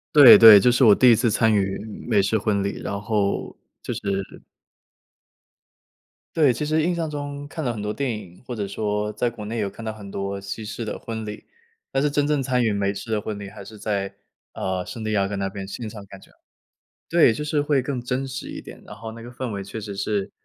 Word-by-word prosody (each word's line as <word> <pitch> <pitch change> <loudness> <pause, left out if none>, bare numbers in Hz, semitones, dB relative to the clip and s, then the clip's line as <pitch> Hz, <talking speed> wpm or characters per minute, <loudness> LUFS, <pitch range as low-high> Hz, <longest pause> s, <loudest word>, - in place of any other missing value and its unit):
对 140 -5 +11
对， 110 -3 +10
这 125 +4 +4
是 125 - +3
我 110 -4 +8
第 125 +3 +6
1 115 - +7
次 115 0 +1
参 110 +1 +3
与 95 -2 +1 0.3
美 105 -4 +3
式 100 +3 +1
婚 100 -1 0
礼， 100 - -3
然 100 0 -3
后 105 -2 -1 0.2
就 - - -5
是 - - -6 2.3
对， 150 -5 +5
其 150 +5 -3
实 155 +1 +1
印 175 +2 0
象 165 -2 -2
中 145 -1 -6
看 160 +2 -6
了 125 - 0
很 110 - -6
多 105 +1 -2
电 135 +1 -2
影， 90 +1 -13
或 125 - -4
者 100 -3 -3
说 105 +1 -2
在 120 +3 0
国 110 -3 -9
内 115 +2 -4
有 100 - -1
看 110 +3 -10
到 110 - -3
很 100 -2 -10
多 100 0 -4
西 105 +2 -6
式 115 +2 -5
的 110 - -4
婚 110 -1 -6
礼， 105 0 -8 0.5
但 135 - +1
是 150 - +2
真 145 0 +1
正 150 -2 +1
参 125 -1 +1
与 110 -3 +1
美 100 -1 0
式 100 +3 -7
的 105 -1 0
婚 105 -1 -5
礼 100 - -7
还 100 0 -11
是 110 +2 -12
在， 100 -2 -3 0.4
呃， 95 -1 -2
圣 115 - -7
地 110 - -2
亚 100 -2 +1
哥 100 - -4
那 100 0 -1
边 95 0 -7
欣 110 +3 -6
赏 105 -1 -9
感 95 - -12
觉。 - - -20 0.8
对， 165 -9 +5
就 150 - -4
是 150 -1 0
会 145 -2 +2
更 130 0 -3
真 125 +2 -2
实 130 -1 -6
一 - - -7
点， - - -12
然 - - -9
后 110 +2 -8
那 115 - -10
个 120 - -9
氛 125 0 -5
围 100 -2 -5
确 105 +3 -7
实 100 -2 -7
是， 100 -1 -2
110 Hz, 260 characters per minute, -23 LUFS, 100-125 Hz, 2.3 s, 对